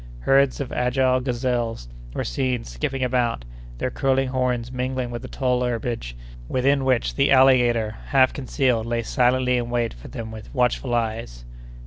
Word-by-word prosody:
Herds 135 - +3
of 140 -3 -4
agile 130 +1 +2
gazelles 120 - -2 0.3
were - - -1
seen 125 - -1
skipping 95 - -3
about, 120 - 0 0.3
their 130 - -2
curling 135 0 +1
horns 125 -2 -1
mingling 130 -1 -2
with 120 -1 -5
the - - -8
tall 125 -2 0
herbage, 115 - -3 0.3
within 135 +2 +2
which 130 -3 +1
the 140 0 +2
alligator, 125 -5 +4
half 130 -2 +4
concealed, 125 -4 0
lay 115 0 -1
silently 125 +1 +2
in 120 -1 -2
wait 120 -1 -1
for - - -12
them 110 -1 -7
with 110 -1 -10
watchful 125 0 +1
eyes. 110 - -3
125 Hz, 155 wpm, -23 LUFS, 115-130 Hz, 0.3 s, alligator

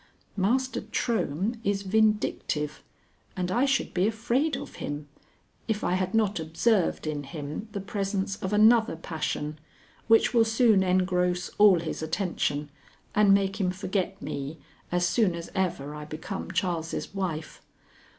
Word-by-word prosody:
Master 250 +7 +1
Trohm 220 - -1
is 200 -2 0
vindictive, 205 -7 0 0.6
and 180 0 -1
I 245 +7 +3
should 275 0 0
be 185 +2 +2
afraid 240 +7 0
of - - -9
him, 145 0 -5 0.6
if 220 -2 -1
I - - +1
had 185 +2 0
not 210 -4 +2
observed 170 +5 +1
in 150 -1 -2
him 145 +7 -6
the 200 - -3
presence 195 0 -2
of 190 - -4
another 220 -1 +5
passion 155 -2 -4 0.5
which 225 +2 +5
will 230 -2 +6
soon 225 -2 +4
engross 180 -1 +1
all 200 -5 +7
his 160 - -4
attention 160 -3 -1 0.4
and 210 -1 +5
make 195 +1 +2
him 185 - +2
forget 190 +1 -2
me 140 -4 -5 0.3
as 175 0 +2
soon 195 -2 +2
as 170 0 -7
ever 155 -6 -1
I 150 0 -7
become 160 +7 -6
Charles' 175 -3 -2
wife. 175 -5 -4
190 Hz, 140 wpm, -27 LUFS, 165-215 Hz, 0.6 s, all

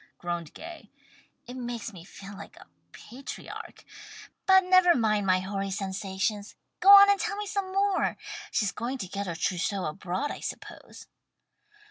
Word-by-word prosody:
groaned 175 -3 -4
Gay. 335 +1 -10 0.6
"It 245 - -9
makes 240 -3 -5
me 175 -3 -11
feel 195 +2 -11
like - - -11
a - - -14 0.3
patriarch. 255 - -9 0.6
But 380 0 +7
never 365 -1 +5
mind 215 -4 +1
my 185 0 +3
hoary 195 +1 -3
sensations, 195 +1 -3 0.2
go 385 - +4
on 400 0 +11
and 405 -1 +3
tell 430 -2 -2
me 415 +1 -4
some 395 -2 -3
more. 395 0 +1 0.3
She's 205 -3 0
going 245 +4 -4
to 195 -7 -5
get 200 +1 -4
her 170 - -3
trousseau 185 +3 -1
abroad 185 - -3
I - - -7
suppose." - - -8
215 Hz, 155 wpm, -28 LUFS, -, 0.6 s, on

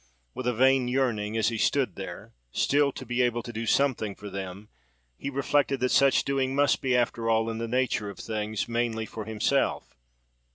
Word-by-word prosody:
With 125 0 -4
a 125 - +2
vain 130 +1 +4
yearning, 115 -5 0
as 110 - +2
he 115 -2 -4
stood 130 -9 +1
there, - - -8 0.2
still 140 - +2
to 130 - -8
be 120 +1 0
able 120 -1 +1
to 120 - -8
do 115 +1 -4
something 115 -6 +1
for 105 -1 -9
them, 100 +2 -7 0.5
he 140 - -5
reflected 140 0 +1
that 130 - +1
such 140 -1 +4
doing 135 -1 0
must 145 0 +3
be, 130 -2 +2
after 115 -1 0
all, 115 0 +2
in 110 - -5
the 115 - -3
nature 120 -4 0
of 100 - -9
things, 110 -1 -3
mainly 115 -1 -1
for 110 -1 -7
himself. 110 +5 0
120 Hz, 195 wpm, -27 LUFS, 110-130 Hz, 0.5 s, vain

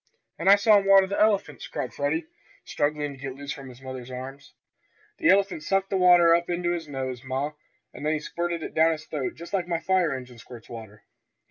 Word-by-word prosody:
"And 175 +3 +2
I 200 - +10
saw 205 0 +5
'em 195 - -5
water 195 -1 +7
the 200 +2 -2
elephants!" 200 -9 +1
cried 125 - -5
Freddie, 150 +3 -1 0.4
struggling 145 0 -1
to 135 - -15
get 135 -1 -6
loose 140 0 -7
from 135 -2 -10
his 125 +1 -14
mother's 130 -1 -7
arms. 135 +2 -9 0.6
"The - - +3
elephant 195 -3 +3
sucked 195 +4 0
the - - +1
water 175 -2 +6
up 170 +1 +1
into 175 0 -1
his 170 -2 -3
nose, 130 -3 -5
ma, 135 +3 -2 0.4
and - - -10
then 155 +1 +1
he 155 - -1
squirted 170 +1 -3
it - - -6
down 160 +1 +4
his 155 -1 -8
throat 145 -4 -4
just 170 +4 -11
like 185 -3 0
my 170 -2 -1
fire 180 -1 +1
engine 125 -2 -7
squirts 115 -1 -13
water. 110 -3 -10
155 Hz, 220 wpm, -26 LUFS, 130-180 Hz, 0.6 s, I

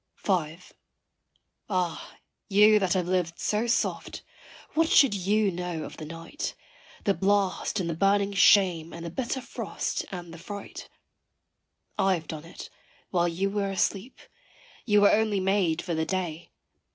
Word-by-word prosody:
V. 165 -5 0 1.1
Ah 180 -4 -2 0.3
you, 210 +2 +6
that 190 -3 +1
have 180 -2 0
lived 180 -2 0
so 215 +3 0
soft, 235 - -1 0.5
what 325 +1 +2
should 275 -7 +6
you 200 +2 +1
know 175 -2 -4
of - - -9
the 155 - -7
night, 165 - -6 0.5
The 200 - +2
blast 200 +1 0
and 180 - -2
the 165 - -1
burning 200 +3 +2
shame 180 -4 +4
and 170 0 -7
the 170 - -5
bitter 260 +6 -3
frost - - -4
and 175 -3 -7
the 165 - -10
fright? 200 +3 -8 1.1
I 195 -1 +3
have 160 -2 -7
done 155 0 -7
it, 165 - -10 0.4
while 175 -2 +2
you 190 +4 -1
were 200 -1 -1
asleep 195 +4 -1 0.7
you 210 -2 +5
were 205 - +6
only 215 -2 +2
made 190 -4 +1
for 175 - -3
the 160 0 0
day. 175 -3 -3
190 Hz, 150 wpm, -27 LUFS, 170-205 Hz, 1.1 s, you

